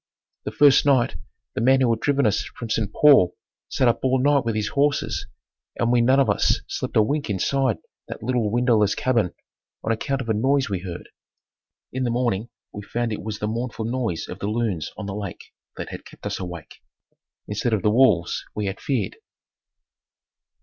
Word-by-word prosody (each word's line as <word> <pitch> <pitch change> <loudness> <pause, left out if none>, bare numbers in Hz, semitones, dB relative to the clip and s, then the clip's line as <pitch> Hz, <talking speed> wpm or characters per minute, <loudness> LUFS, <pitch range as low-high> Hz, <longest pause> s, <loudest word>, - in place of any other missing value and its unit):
The - - -3
first 145 -1 +5
night 135 -4 +3 0.4
the - - -2
man 130 +3 +5
who 125 -3 +3
had 115 - 0
driven 140 0 +1
us 105 - +2
from 115 -2 -6
St. 105 -3 0
Paul 135 -13 +5 0.3
sat 130 - +2
up 120 - +2
all 130 0 +2
night 140 +1 +3
with 115 -2 -1
his 105 -1 -1
horses 145 +1 0 0.5
and 120 0 +1
we 120 -1 +4
none 130 +3 +4
of 135 - +3
us - - +2
slept - - -3
a 110 - +6
wink 145 +3 -2
inside 120 +5 +1 0.3
that - - -8
little 120 -2 0
windowless 115 -3 +2
cabin 115 -8 +1 0.5
on 115 - 0
account 135 +4 -1
of 120 - -7
a 110 - +2
noise 130 +2 +1
we 95 - -1
heard. 90 -2 -8 0.8
In 130 - -2
the 120 - 0
morning 120 -2 -1 0.2
we 105 - -6
found 115 +2 -2
it - - -5
was 105 -1 -5
the 105 - -3
mournful 115 0 -3
noise 115 -7 -2
of 90 - -8
the 100 - -3
loons 105 -7 -1
on 105 - -5
the 100 - -4
lake 100 -4 -7 0.2
that - - -5
had - - -8
kept - - -15
us - - -3
awake, 85 -4 -8 0.7
instead 105 +3 -1
of 110 -4 0
the 105 - +3
wolves 110 -9 +3
we 105 - -2
had 95 0 -4
feared. 120 -9 -2
115 Hz, 195 wpm, -23 LUFS, 105-130 Hz, 0.8 s, a